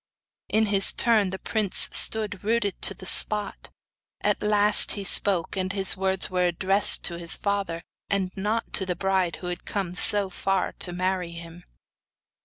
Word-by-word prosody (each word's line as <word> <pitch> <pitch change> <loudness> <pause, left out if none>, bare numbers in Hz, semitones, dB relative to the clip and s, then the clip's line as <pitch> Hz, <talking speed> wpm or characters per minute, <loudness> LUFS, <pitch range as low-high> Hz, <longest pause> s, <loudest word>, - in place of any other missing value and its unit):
In 220 +1 +1
his 200 -2 +5
turn, 220 -5 +1
the 190 - -7
prince 210 -1 +1
stood 210 -3 +1
rooted 215 -2 -2
to 195 - +2
the 185 - -13
spot. 210 +2 +1 0.5
At - - -2
last 210 0 +3
he 200 - -7
spoke, 195 -3 +4
and 185 -1 -3
his 195 -1 0
words 190 0 0
were 180 -1 -1
addressed 190 +4 +2
to 170 -1 -3
his 170 -1 +2
father, 200 -5 -4 0.3
and 195 -2 -2
not 210 +4 -4
to 190 - +2
the 180 - -3
bride 190 -1 -2
who 180 - -10
had 175 - -13
come 190 -4 -5
so 195 +1 0
far 195 +1 -2
to 180 - -1
marry 180 -1 -4
him. 170 +1 -12
195 Hz, 170 wpm, -24 LUFS, 180-205 Hz, 0.5 s, his